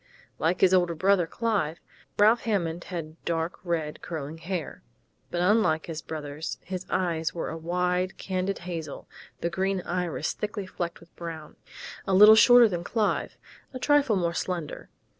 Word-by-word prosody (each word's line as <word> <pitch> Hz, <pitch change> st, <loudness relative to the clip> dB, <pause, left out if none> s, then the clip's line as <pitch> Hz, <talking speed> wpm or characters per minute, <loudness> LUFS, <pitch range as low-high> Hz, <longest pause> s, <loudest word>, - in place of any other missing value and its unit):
Like 170 Hz, +3 st, +1 dB
his 190 Hz, -1 st, +5 dB
older 175 Hz, -2 st, +3 dB
brother, 185 Hz, 0 st, +3 dB
Clive, 200 Hz, -8 st, -1 dB, 0.4 s
Ralph 220 Hz, +3 st, +5 dB
Hammond 175 Hz, -6 st, -1 dB
had 165 Hz, -3 st, -7 dB
dark 165 Hz, 0 st, -2 dB
red, 165 Hz, -4 st, -2 dB
curling 160 Hz, -1 st, -6 dB
hair. 170 Hz, -2 st, -5 dB, 0.5 s
But 175 Hz, -, -2 dB
unlike 180 Hz, -5 st, +3 dB
his 160 Hz, -2 st, -5 dB
brother's, 150 Hz, 0 st, -5 dB
his 185 Hz, 0 st, -6 dB
eyes 170 Hz, -3 st, -1 dB
were 170 Hz, -, -3 dB
a -, -, -5 dB
wide, 180 Hz, +2 st, -1 dB
candid 190 Hz, +1 st, -2 dB
hazel 165 Hz, -5 st, -6 dB, 0.3 s
the 170 Hz, -, -1 dB
green 190 Hz, +1 st, 0 dB
iris 175 Hz, -3 st, -2 dB
thickly 210 Hz, -1 st, -4 dB
flecked 175 Hz, -2 st, -5 dB
with 170 Hz, -, -19 dB
brown. 160 Hz, -3 st, -8 dB, 0.5 s
A 190 Hz, -, +2 dB
little 210 Hz, +3 st, +10 dB
shorter 245 Hz, +1 st, +8 dB
than 175 Hz, -4 st, -3 dB
Clive, 215 Hz, +3 st, -1 dB, 0.4 s
a -, -, -1 dB
trifle 285 Hz, -3 st, +3 dB
more 170 Hz, -3 st, 0 dB
slender. 170 Hz, -3 st, -4 dB
175 Hz, 155 wpm, -27 LUFS, 165-195 Hz, 0.5 s, little